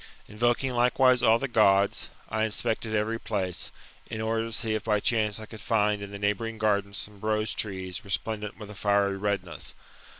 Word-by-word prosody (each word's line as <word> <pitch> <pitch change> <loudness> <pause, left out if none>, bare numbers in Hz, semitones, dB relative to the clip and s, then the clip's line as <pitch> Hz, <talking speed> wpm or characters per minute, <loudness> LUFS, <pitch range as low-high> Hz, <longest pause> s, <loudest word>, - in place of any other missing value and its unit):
Invoking 120 +5 +1
likewise 125 +1 +4
all 110 +1 +6
the. 135 - -2
Gods, 100 -4 +3 0.2
I 110 0 0
inspected 110 0 -1
every 110 +2 0
place, 95 -6 -2 0.4
in 110 - -5
order 110 +1 0
to 115 - -6
see 110 0 +1
if 110 - -1
by 105 -2 +2
chance 105 -1 +1
I 110 - -7
could 110 -1 -11
find 105 -2 +2
in 100 - -6
the 100 - -7
neighbouring 105 +3 -1
gardens 100 -2 +1
some 105 -1 -4
rose 110 -1 0
trees 95 -4 -3
resplendent 105 +1 -3
with 105 -2 -9
a - - -8
fiery 100 -1 +2
redness. 95 -5 -3
105 Hz, 180 wpm, -28 LUFS, 100-115 Hz, 0.4 s, all